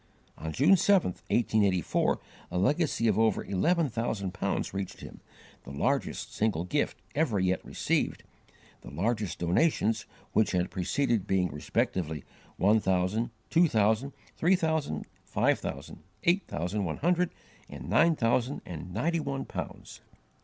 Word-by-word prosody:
On 80 +2 -5
June 145 - +5
7, 190 - +4
1884, 100 -3 +1 0.3
a - - -3
legacy 135 - +2
of 105 -1 +2
over 110 -2 +2
eleven 165 - +1
thousand 110 -6 -2
pounds - - -2
reached 95 -1 -5
him, - - -10 0.4
the - - -11
largest 70 - -1
single 105 -6 0
gift 90 - -1 0.2
ever 140 -9 +1
yet 95 0 +1
received, - - -1 0.6
the - - -10
largest 105 +5 -1
donations 110 - +1 0.3
which 110 - +3
had 90 0 0
preceded 115 +3 0
being 95 -2 +2
respectively 75 +1 -2 0.3
one 105 +3 +4
thousand, 95 +4 +1 0.2
two 170 +1 +5
thousand, 110 +2 +2 0.2
three 180 +4 +3
thousand, 160 - -1 0.2
five - - +1
thousand, 70 0 -6 0.2
eight 180 +3 +2
thousand 90 +6 -2
one 80 -4 -2
hundred, 175 +2 +2 0.4
and - - -8
nine 170 -1 +4
thousand 120 +2 +1
and 90 +1 -7
ninety 165 - 0
one 140 -3 -3
pounds. - - -7
110 Hz, 140 wpm, -29 LUFS, 90-145 Hz, 0.6 s, June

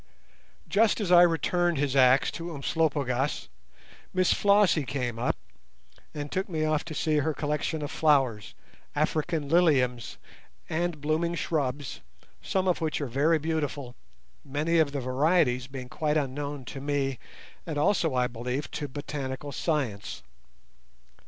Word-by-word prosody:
Just 220 +3 +3
as 195 -4 -1
I 175 -1 +9
returned 175 0 +2
his 140 -1 0
axe 130 0 +5
to 170 -1 -6
Umslopogaas, 140 -3 -1 0.7
Miss 185 -1 +4
Flossie 200 -6 +4
came 125 -3 -3
up - - 0 0.8
and 145 -1 -6
took 190 +1 -2
me 155 -3 -1
off 155 0 +1
to 160 -2 -6
see 155 0 +1
her 150 +1 0
collection 150 +1 -2
of 145 - -4
flowers, 135 -9 +2 0.4
African 155 0 0
liliums, 135 -8 +2 0.5
and 165 -1 -2
blooming 160 +3 0
shrubs, 145 -5 -2 0.4
some 190 -1 -1
of 180 -1 +1
which 160 -1 -1
are 145 - -2
very 140 +6 +2
beautiful, 145 -5 -3 0.5
many 150 +4 0
of 155 -3 +3
the 140 -1 -3
varieties 130 -1 +2
being 130 -2 -7
quite 150 +3 0
unknown 145 -1 -3
to 135 - -7
me 140 -2 -1 0.5
and 155 -3 -3
also, 160 -2 +2
I 125 0 +3
believe, 125 +4 -4
to 145 - -4
botanical 140 0 -5
science. 120 - -2
145 Hz, 140 wpm, -28 LUFS, 135-160 Hz, 0.8 s, I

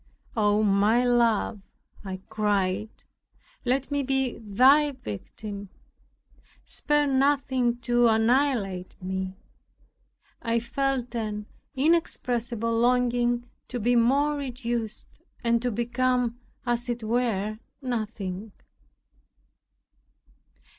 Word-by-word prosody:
"Oh, 210 -1 +3
my 210 +4 +3
Love," 230 -3 +2 0.4
I 190 -1 -6
cried, 210 -1 0 0.8
"let 260 +3 0
me 285 0 +1
be 265 -2 0
thy 265 +8 +4
victim! 205 - -7 1.0
Spare 295 0 +1
nothing 265 -3 +2
to 240 0 +3
annihilate 225 -5 +1
me." 190 0 -3 1.1
I 230 0 +1
felt 255 0 -1
an 210 -3 -3 0.3
inexpressible 240 -6 +1
longing 240 0 +2 0.2
to 245 - -4
be 240 +3 +2
more 275 +6 +3
reduced, 240 -4 -4 0.2
and 235 -1 +2
to 250 - 0
become, 245 +1 0 0.3
as 240 0 -1
it 240 -1 -2
were, 215 -2 0 0.2
nothing. 215 -5 -4
240 Hz, 90 wpm, -26 LUFS, 215-255 Hz, 1.1 s, thy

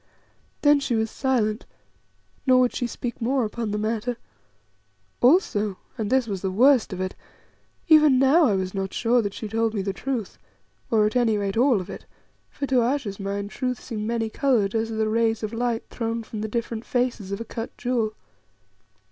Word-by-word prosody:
Then 290 -1 +6
she 275 -4 -1
was 220 0 0
silent, 230 -5 0 0.8
nor 255 -1 +6
would 250 - +2
she 245 - -1
speak 240 +1 -6
more 255 +1 +1
upon 225 +1 -4
the 210 - -2
matter. 225 +3 -2 1.0
Also 215 - +3 0.2
and 220 -4 -3
this 260 0 +3
was 195 -4 -4
the 190 - -1
worst 245 +5 +4
of 185 - -5
it 185 0 -2 0.7
even 305 -4 +6
now 275 +6 +5
I 205 - +2
was 185 -1 -2
not 195 -1 -3
sure 240 +1 +3
that 205 -2 -4
she 220 - -5
told 225 +1 0
me 200 - -1
the 195 0 -2
truth, 240 -1 -4 0.5
or, 215 -2 +3
at 215 - -1
any 235 -4 +3
rate, 200 -1 -2
all 245 -1 +4
of 185 - -6
it, - - -9 0.4
for 285 - -4
to 260 -2 +2
Ayesha's 235 -5 -1
mind 200 +1 -3
truth 250 -1 -2
seemed 215 -3 -5
many 230 -1 -1
coloured 220 -4 +1
as 225 0 0
are 225 - -4
the 220 0 +1
rays 225 0 +1
of 215 +1 -3
light 235 0 -1
thrown 230 -1 -3
from 215 -1 -6
the 220 - -2
different 230 0 -3
faces 245 -6 -1
of 200 - -3
a 230 - -5
cut 225 0 -6
jewel. 230 -3 -1
225 Hz, 195 wpm, -24 LUFS, 210-250 Hz, 1.0 s, Then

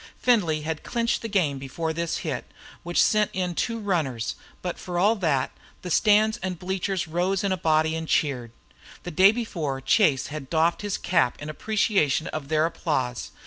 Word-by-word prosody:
Findlay 180 -11 +2
had 160 0 -3
clinched 235 -1 -1
the 230 - -4
game 170 -10 0
before 160 +5 -3
this 170 0 -2
hit, 140 -6 -3 0.4
which 175 0 -1
sent 215 -1 +3
in 180 -2 -1
two 230 +6 -1
runners, 155 - -1 0.3
but 180 -1 -4
for 175 -1 -5
all 205 +6 +4
that, 150 -9 0 0.3
the 180 - -5
stands 215 +4 +4
and 185 -5 -4
bleachers 190 +1 -2
rose 180 +4 0
in 200 - 0
a - - +2
body 160 -2 +2
and 160 0 -4
cheered. 125 -8 0 0.5
The 175 - -5
day 190 +5 +6
before 170 - -3
Chase 135 - +3
had 145 -4 -6
doffed 165 +1 +2
his 205 -1 -2
cap 170 -8 +1
in 150 +1 -5
appreciation 195 -5 +1
of 150 -3 -5
their 155 +1 +2
applause. 135 -7 -2
170 Hz, 180 wpm, -25 LUFS, 155-195 Hz, 0.5 s, day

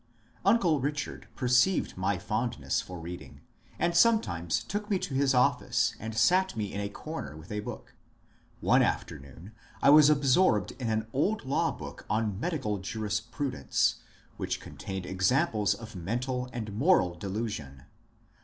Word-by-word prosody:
Uncle 175 -10 +3
Bichard 145 +2 -3
perceived 125 +8 +2
my 95 +1 0
fondness 105 - -1
for 90 -1 -8
reading, 85 +2 -9 0.4
and 170 0 0
sometimes 100 - +2
took 210 +1 -4
me 200 - +2
to 160 - -5
his 135 0 +2
office 125 -2 +2
and 110 0 -6
sat 185 +10 +3
me 105 -2 -3
in 100 - -3
a 100 - -3
comer 100 - -7
with 80 +5 -12
a 105 - -2
book. 105 - -8 0.7
One - - +4
afternoon 70 +9 -3 0.3
I 140 - +6
was 150 0 +8
absorbed 140 - +3
in 120 -3 -2
an 110 0 0
old 190 +6 0
law 135 - +1
book - - -9
on 105 -3 0
Medical 130 - -2
Jurisprudence, 110 - -1 0.4
which - - -2
contained 95 -2 -7
examples 105 - +1
of 115 0 -10
men 95 +7 -2
tal 125 0 -3
and 110 -4 -5
moral 115 - +3
delusion. 90 - -5
110 Hz, 145 wpm, -29 LUFS, 95-140 Hz, 0.7 s, was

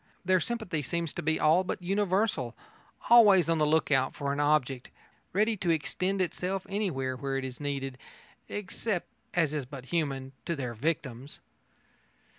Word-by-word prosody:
Their 185 0 +4
sympathy 220 -8 -2
seems 170 +3 -2
to - - -4
be 160 0 +1
all 160 +4 +4
but 185 - -3
universal, 190 - 0 0.6
always 205 -8 +8
on 165 -1 +2
the 150 - +3
look 160 0 +2
out 130 -1 +2
for 140 -1 -2
an 140 - -3
object, 140 -4 +1 0.4
ready 215 +4 +2
to 180 -2 -2
extend 185 +4 +1
itself 185 +2 -3
anywhere 165 -11 -1
where 135 +1 -2
it 135 - -3
is 130 -1 -7
needed, 135 -3 -3 0.5
except, 205 -1 -3 0.3
as 165 -4 +2
is 145 -4 -3
but 130 -1 -9
human, 135 -5 -1 0.2
to 170 - 0
their 125 -5 -4
victims. 135 0 -3
160 Hz, 160 wpm, -29 LUFS, 135-185 Hz, 0.6 s, always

